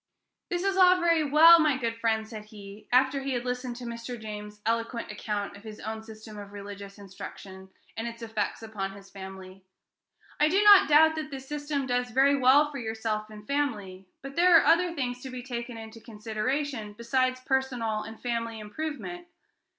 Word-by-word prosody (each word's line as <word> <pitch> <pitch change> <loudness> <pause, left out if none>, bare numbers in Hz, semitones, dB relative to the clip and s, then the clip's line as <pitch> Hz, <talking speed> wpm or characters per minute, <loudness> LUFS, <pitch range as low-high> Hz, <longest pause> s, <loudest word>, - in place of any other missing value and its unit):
"This 350 0 -1
is 390 -1 0
all 365 -1 +6
very 335 -2 +3
well, 320 +4 +8
my 305 -4 +3
good 230 -3 -2
friend," 225 -1 0
said 215 -2 -9
he, 210 0 -12
after 265 +2 +3
he 270 0 -2
had 245 0 -2
listened 250 0 -3
to 245 - -9
Mr. 235 +1 -6
James's 210 -1 -8
eloquent 230 0 -2
account 210 -1 -4
of 200 - -13
his 215 -1 -10
own 220 +1 -5
system 215 -1 -11
of 200 0 -10
religious 200 0 -9
instruction, 190 -1 -10 0.3
and 225 +2 -4
its 230 0 -8
effects 220 -1 -3
upon 200 -3 -5
his 195 0 -14
family, 190 -1 -10 0.8
"I 300 - +5
do 390 +5 +3
not 405 -4 +8
doubt 315 +2 +6
that 310 -1 -4
this 270 -2 -8
system 290 -1 -3
does 250 -1 -1
very 270 +4 +4
well 280 +3 +5
for 280 - -6
yourself 220 -2 -3
and 210 -1 -12
family; 210 -10 -3 0.2
but 275 0 -8
there 350 0 +7
are - - +3
other 345 +2 +4
things 250 -3 -3
to 265 - -7
be 255 -1 -7
taken 240 -1 -5
into 225 0 -10
consideration 225 +2 -3
besides 255 +2 0
personal 250 -5 -1
and 225 +1 -9
family 230 -2 -3
improvement. 315 +10 -6
235 Hz, 185 wpm, -28 LUFS, 215-275 Hz, 0.8 s, well